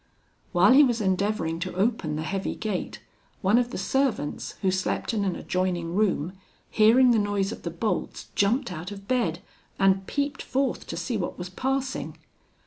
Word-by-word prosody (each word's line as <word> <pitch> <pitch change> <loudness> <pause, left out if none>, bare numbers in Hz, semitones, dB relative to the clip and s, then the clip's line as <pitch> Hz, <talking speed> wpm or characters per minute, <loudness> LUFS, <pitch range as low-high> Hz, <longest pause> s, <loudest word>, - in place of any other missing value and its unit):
"While 180 +2 +5
he 285 +3 +8
was 240 -4 +2
endeavouring 190 -4 0
to 185 +1 -4
open 190 -6 0
the 155 - -3
heavy 195 +4 -2
gate, 210 -5 -4 0.4
one 205 +5 +5
of 245 -1 0
the - - -5
servants, 265 - -1
who 190 - +3
slept 185 +4 -1
in 210 -2 0
an 190 -3 0
adjoining 180 -2 -2
room, 185 -4 +1 0.4
hearing 240 +4 +6
the 230 - +4
noise 205 -1 0
of - - -7
the 170 - -4
bolts, 190 +6 -3
jumped 225 +3 +1
out 170 +1 -6
of 200 -1 -10
bed, 190 -10 0 0.3
and 195 0 +3
peeped 285 -1 -2
forth 265 -1 -1
to - - -5
see 240 -4 -2
what 180 - -3
was 180 0 -6
passing. 265 +5 -2
200 Hz, 175 wpm, -26 LUFS, 185-240 Hz, 0.4 s, he